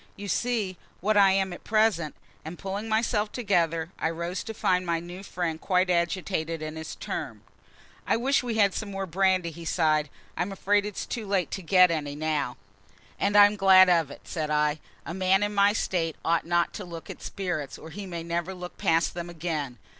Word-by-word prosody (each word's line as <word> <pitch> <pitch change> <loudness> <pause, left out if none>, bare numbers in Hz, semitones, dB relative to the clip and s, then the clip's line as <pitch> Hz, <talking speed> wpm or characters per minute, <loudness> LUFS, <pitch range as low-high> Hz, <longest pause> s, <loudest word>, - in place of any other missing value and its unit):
"You 200 - -7
see 210 -3 -1 0.2
what 215 +4 +1
I 200 -2 +6
am 190 -1 0
at - - -10
present." 215 -8 +1 0.3
And, 160 +3 -7
pulling 200 +3 -4
myself 220 -1 +1
together, 170 -7 0
I - - +1
rose 170 +2 -4
to 225 - -5
find 180 -2 +1
my 170 -2 0
new 175 +2 -9
friend 170 -5 -3
quite 185 -1 +2
agitated 170 -1 -1
in 155 0 -5
his 160 0 -6
turn. - - -5 0.6
"I - - +3
wish 270 +4 +2
we 240 -3 -3
had 200 -3 +4
some 215 - -4
more 195 -1 -3
brandy," 185 -1 +1
he 170 +1 -10
sighed. 155 -3 +1 0.3
"I'm 180 +3 -2
afraid 205 +1 +1
it's 210 - -5
too 225 -4 -5
late 190 -5 0
to 195 - -4
get 180 0 +5
any 145 -3 -2
now." 150 -4 -1 0.6
"And 205 +1 +2
I'm 205 0 +7
glad 190 -2 +7
of 165 -5 +3
it," - - -11
said 155 -2 -4
I. 150 0 +1 0.3
"A 170 - -5
man 190 +2 +2
in 205 0 -1
my 200 0 +5
state 170 -6 -1
ought 165 0 +1
not 175 0 +1
to 205 - -6
look 170 -2 -8
at - - -11
spirits, 175 -8 -4
or 160 - -11
he 200 +3 -7
may 170 -2 -5
never 170 +2 -3
look 180 -1 -9
past 165 +1 +2
them 175 0 -5
again. 155 -6 -4
180 Hz, 200 wpm, -27 LUFS, 165-200 Hz, 0.6 s, I'm